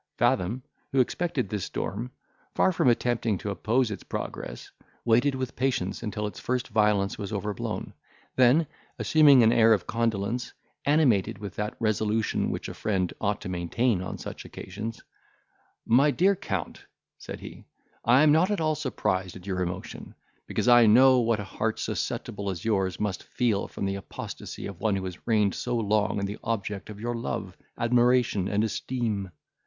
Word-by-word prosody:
Fathom, 110 +8 +1 0.3
who 135 - +2
expected 130 - 0
this 100 -1 -3
storm, 115 +5 -4 0.5
far - - +4
from 165 - +1
attempting 120 -3 +1
to 100 - -4
oppose 110 +5 +1
its 100 - -5
progress, - - -6 0.3
waited 120 +4 +3
with 130 -2 -4
patience 125 -8 -1
until 105 -2 -3
its 105 - -6
first 125 +1 -2
violence 105 -2 +2
was 100 - -5
overblown; 105 -1 -4 0.4
then, 130 +6 +5 0.3
assuming 145 -5 +6
an 110 - +5
air 115 -1 +6
of 100 -5 0
condolence, 115 +1 -1 0.3
animated 140 - +3
with 100 -3 -7
that 105 0 -3
resolution 110 0 0
which - - -4
a - - -6
friend 95 -4 -1
ought 105 0 0
to - - -6
maintain 90 +4 0
on 95 - -5
such - - -7
occasions, 105 +5 -7 0.8
"My 130 +6 +5
dear 190 +7 +3
Count," - - -4 0.4
said - - -8
he, - - -10 0.4
"I 125 +5 +5
am 155 - +6
not 165 +5 +4
at 205 - 0
all 155 -1 +1
surprised 100 - -2
at 90 0 -11
your 95 -2 -2
emotion, 90 +1 -5 0.3
because - - -1
I 120 -2 +7
know 130 +4 +7
what 115 -2 +2
an 105 - -5
heart, 110 +3 -2
susceptible 100 -1 -3
as 90 -1 -5
yours, 95 -5 0
must 105 -3 -2
feel 115 -5 0
from - - -5
the 95 - -1
apostasy 100 - -7
of 100 -4 -8
one 110 -3 +2
who 95 -1 -3
has 90 -1 -8
reigned 105 -4 +3
so 125 -1 -2
long 105 -2 +1
the 100 +2 -5
object 105 -3 -3
of 105 -1 -9
your 120 +2 -2
love, 115 -5 -4 0.2
admiration, 120 -4 +3
and 105 +2 +1
esteem. 110 -3 -2
110 Hz, 170 wpm, -27 LUFS, 100-125 Hz, 0.8 s, I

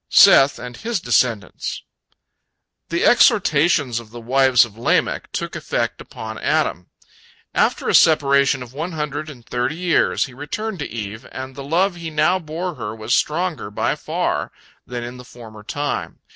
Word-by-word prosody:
SETH 135 +1 +7
AND 120 0 -8
HIS 230 -3 -2
DESCENDANTS 120 -6 -1 1.1
The 170 +1 0
exhortations 155 - +4
of 115 -2 -12
the 120 +2 -9
wives 130 0 +4
of 110 -3 -14
Lamech 115 - 0
took - - -4
effect - - -2
upon 110 0 -8
Adam. 90 - 0 0.7
After - - +1
a - - +1
separation 140 -3 +4
of 125 0 -13
one 165 +5 -4
hundred 150 0 -4
and 125 -6 -12
thirty 125 +4 -2
years, 175 -2 +2
he 130 - -12
returned 190 - -5
to 145 - -4
Eve, 110 -1 -6
and 130 0 -7
the 140 - -8
love 175 +6 +1
he 165 -1 -5
now 175 +4 +2
bore 170 +2 -4
her 110 -6 -6
was 110 +1 -2
stronger 160 - 0
by 105 - -1
far - - -2 0.4
than 120 -1 -5
in 120 +1 -7
the 125 - -10
former 115 -3 -12
time. 145 +7 -3
135 Hz, 160 wpm, -21 LUFS, 120-160 Hz, 1.1 s, SETH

